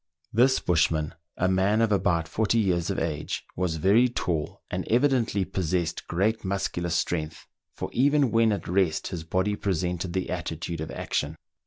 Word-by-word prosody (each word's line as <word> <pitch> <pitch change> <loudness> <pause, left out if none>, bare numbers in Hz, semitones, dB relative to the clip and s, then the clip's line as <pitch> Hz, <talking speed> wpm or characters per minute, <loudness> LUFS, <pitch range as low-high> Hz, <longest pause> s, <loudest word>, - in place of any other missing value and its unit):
This 130 +4 +4
bushman, 80 -2 +1 0.2
a 95 - +2
man 95 +3 +2
of 115 -1 +2
about 90 -5 +1
forty 110 +6 +1
years 90 -6 +1
of - - -1
age, 80 -3 -3
was 90 -2 -1
very 100 +10 +4
tall, 80 -10 -3
and - - -2
evidently 120 -5 +2
possessed 85 -2 -2
great 105 +6 0
muscular 95 -3 -2
strength, 80 -2 -2 0.3
for - - -5
even 140 -1 +3
when 115 -1 +4
at 100 - -3
rest 90 -3 +1
his 85 -3 -5
body 95 +5 0
presented 90 -2 -2
the 95 -1 -2
attitude 85 -1 -4
of 80 - -4
action. 75 +2 -2
95 Hz, 160 wpm, -26 LUFS, 85-105 Hz, 0.3 s, This